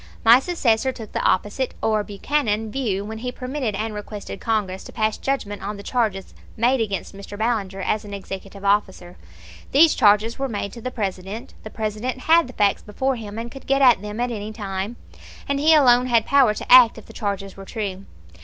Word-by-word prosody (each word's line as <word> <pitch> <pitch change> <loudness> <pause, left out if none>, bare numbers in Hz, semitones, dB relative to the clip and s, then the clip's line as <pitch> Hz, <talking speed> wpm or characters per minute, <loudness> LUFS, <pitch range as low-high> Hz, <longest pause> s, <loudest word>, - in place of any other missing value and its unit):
My 235 +3 +8
successor 265 -6 +1
took 225 -4 -10
the - - -2
opposite, 210 +7 0
or 215 -1 +1
Buchanan, 220 0 -1
view 210 -7 -2
when 220 +1 -6
he 250 +2 -4
permitted 255 -4 -3
and 215 +2 -3
requested 210 -1 -7
Congress 200 -4 -1
to - - -10
pass 215 -1 0
judgment 210 -7 -3
on 205 +1 -5
the 200 - -9
charges 210 -5 -1 0.2
made 245 +2 +2
against 200 -3 -3
Mr. 200 +1 -9
Ballinger 205 -4 -1
as 215 +3 -1
an 205 - -10
executive 195 0 -8
officer. 190 -3 0 0.6
These 310 +3 +6
charges 210 +3 +3
were 270 0 -1
made 200 -3 -4
to 235 - -9
the 255 - -3
President; 200 -1 -5
the 215 - -8
President 220 +4 -4
had 330 +1 +4
the 255 - -11
facts 205 -3 +2
before 260 +6 -2
him 215 -2 -8
and 235 +1 -5
could 270 - -12
get 275 0 +3
at 245 -7 +6
them 210 +1 -6
at 245 0 0
any 215 -1 -5
time, 200 0 -4 0.5
and 280 0 0
he 315 +2 +5
alone 250 -4 +5
had 230 -3 +3
power 260 -6 +4
to - - -6
act 245 -3 +8
if 220 - -11
the - - -14
charges 200 -3 -4
were 195 - -10
true. 195 -3 -5
220 Hz, 200 wpm, -22 LUFS, 205-250 Hz, 0.6 s, My